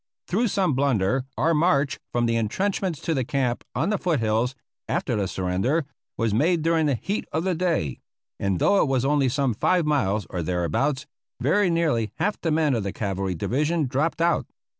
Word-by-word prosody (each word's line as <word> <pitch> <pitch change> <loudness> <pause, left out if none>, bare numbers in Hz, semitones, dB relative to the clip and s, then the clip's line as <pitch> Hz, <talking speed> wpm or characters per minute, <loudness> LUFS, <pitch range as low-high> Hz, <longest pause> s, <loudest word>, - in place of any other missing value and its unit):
Through 225 +7 +1
some 190 -6 +1
blunder 130 -2 +1
our 165 +1 +2
march 150 -3 +2
from 120 0 +1
the 115 0 +1
intrenchments 180 - -1
to 165 - -1
the 135 -4 0
camp 125 -1 -1
on 155 +11 +1
the 210 - 0
foothills, 125 -6 0 0.3
after - - 0
the 100 -2 0
surrender, 95 - 0 0.3
was 115 -2 0
made 160 +7 +2
during 165 -1 +2
the 140 - +2
heat 200 - -3
of 160 - -1
the 190 0 +1
day; 165 - -1 0.4
and 100 -2 0
though 200 - +3
it - - +2
was 135 -1 +1
only 140 -2 +3
some 135 -1 +1
five 175 - +2
miles 110 - +1
or 90 - -2
thereabouts, 90 - 0 0.3
very 180 +10 +2
nearly 150 - +1
half 210 - -1
the 165 - 0
men 155 -2 +2
of 115 - 0
the 100 -1 -3
cavalry 95 -3 -2
division 150 - 0
dropped 145 +6 -1
out. 170 0 +2
140 Hz, 185 wpm, -24 LUFS, 115-165 Hz, 0.4 s, though